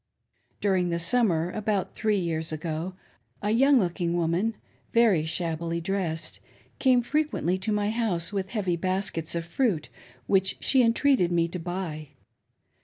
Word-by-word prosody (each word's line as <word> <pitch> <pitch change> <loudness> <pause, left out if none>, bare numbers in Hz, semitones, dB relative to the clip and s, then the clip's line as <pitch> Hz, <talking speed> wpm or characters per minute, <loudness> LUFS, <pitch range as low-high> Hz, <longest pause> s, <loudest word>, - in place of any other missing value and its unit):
During 185 -3 +2
the 170 - 0
summer, 175 -3 +2
about 205 -2 -1
three 215 -2 +1
years 165 -3 -2
ago, 160 +3 -4 0.5
a 210 - +1
young 270 +5 +5
looking 175 -4 0
woman, 175 +7 0 0.4
very 215 -9 +4
shabbily 165 0 -2
dressed, 170 -2 -3 0.4
came 255 -2 +4
frequently 275 - 0
to 190 +3 -2
my 210 0 +1
house 205 -6 0
with 195 -1 -2
heavy 190 -6 -1
baskets 185 -2 -2
of 170 -1 -2
fruit 170 - 0 0.4
which 190 -1 +2
she 265 - +4
entreated 235 -5 +3
me 170 -1 +2
to 180 - -5
buy. 170 -3 -5
185 Hz, 140 wpm, -27 LUFS, 170-215 Hz, 0.5 s, young